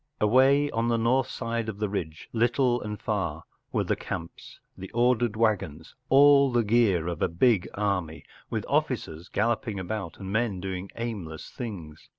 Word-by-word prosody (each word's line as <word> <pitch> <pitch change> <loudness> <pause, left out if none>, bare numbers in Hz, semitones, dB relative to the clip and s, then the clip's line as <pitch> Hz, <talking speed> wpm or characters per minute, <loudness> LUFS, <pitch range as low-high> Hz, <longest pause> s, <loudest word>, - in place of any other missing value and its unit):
Away 135 +6 +4
on 115 +1 0
the 120 -1 +2
north 120 +3 +2
side 115 -2 -3
of 105 - -6
the 105 0 -1
ridge, 80 -6 -5
little 120 +2 +2
and 105 -1 -5
far, - - -2 0.3
were - - +1
the - - 0
camps, 85 0 -7 0.2
the 95 - -9
ordered 120 -2 +2
waggons, 100 -8 -1 0.2
all 140 0 +6
the 120 -1 +2
gear 105 -6 +3
of 85 -2 -4
a - - +3
big 95 +3 +2
army; 90 -6 -2 0.3
with - - -3
officers 80 +3 -1
galloping 110 -3 -1
about 95 -1 -5
and 95 -1 -7
men 110 -4 0
doing 95 0 -5
aimless 100 -10 -5
things. 85 -10 -8
110 Hz, 160 wpm, -27 LUFS, 90-120 Hz, 0.3 s, all